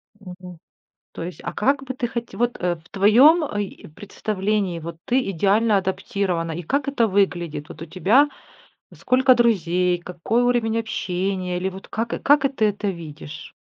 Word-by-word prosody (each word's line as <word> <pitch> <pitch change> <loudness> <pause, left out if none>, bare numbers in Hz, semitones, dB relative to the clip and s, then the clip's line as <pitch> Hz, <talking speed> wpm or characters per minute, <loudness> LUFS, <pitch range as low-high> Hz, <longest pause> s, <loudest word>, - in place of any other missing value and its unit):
Мгм. 180 -3 -11 0.5
То - - -7
есть, 180 +1 -7
а - - -4
как 275 +4 +1
бы 260 -1 -5
ты 245 -2 -2
хоть 235 0 -6
Вот, 240 +1 0
э, 175 -1 0
в 160 +1 -20
твоем, 250 - +5
а, 205 -8 -3
и 200 - -6
представлении, 200 +1 -2
вот 165 0 -8
ты 250 -3 +1
идеально 205 +4 +2
адаптирована. 190 -3 -2
И 175 +2 -5
как 280 - -1
это 240 -5 +2
выглядит? 175 -6 -1
Вот 160 - -11
у - - -5
тебя 210 - +3 0.6
сколько 255 0 +3
друзей, 180 -6 +2
какой 180 +7 -1
уровень 235 -2 +1
общения? 185 -4 -2
Или 185 +2 -1
вот 190 +1 -10
как, 225 +2 -3
э, - - -3
как 290 0 +4
это 275 0 -1
ты 215 - +3
это 205 0 -1
видишь? 155 -3 -8
200 Hz, 175 wpm, -22 LUFS, 180-235 Hz, 0.6 s, твоем